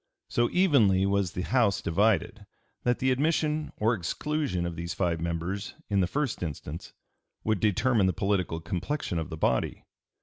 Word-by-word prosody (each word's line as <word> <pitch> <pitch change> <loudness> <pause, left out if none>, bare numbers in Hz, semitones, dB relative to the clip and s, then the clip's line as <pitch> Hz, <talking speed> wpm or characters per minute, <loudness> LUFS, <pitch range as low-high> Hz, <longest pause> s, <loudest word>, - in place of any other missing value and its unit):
So 120 0 +2
evenly 120 - +4
was 100 -2 +1
the 90 - -3
House 120 -5 +2
divided 100 +2 +1 0.3
that 120 0 +1
the 130 0 +1
admission 155 +2 +1
or 110 +3 +2
exclusion 115 - -2
of 85 -1 -4
these 85 +1 -4
five 85 -3 0
members 85 +4 -3 0.2
in 100 - +3
the 90 - +3
first 145 +4 -2
instance 80 -1 -6 0.5
would 110 -2 +1
determine 110 +1 +3
the - - +3
political 90 -2 0
complexion 90 - -2
of 80 - -4
the 80 - -6
body. 65 -5 0
100 Hz, 160 wpm, -28 LUFS, 85-125 Hz, 0.5 s, evenly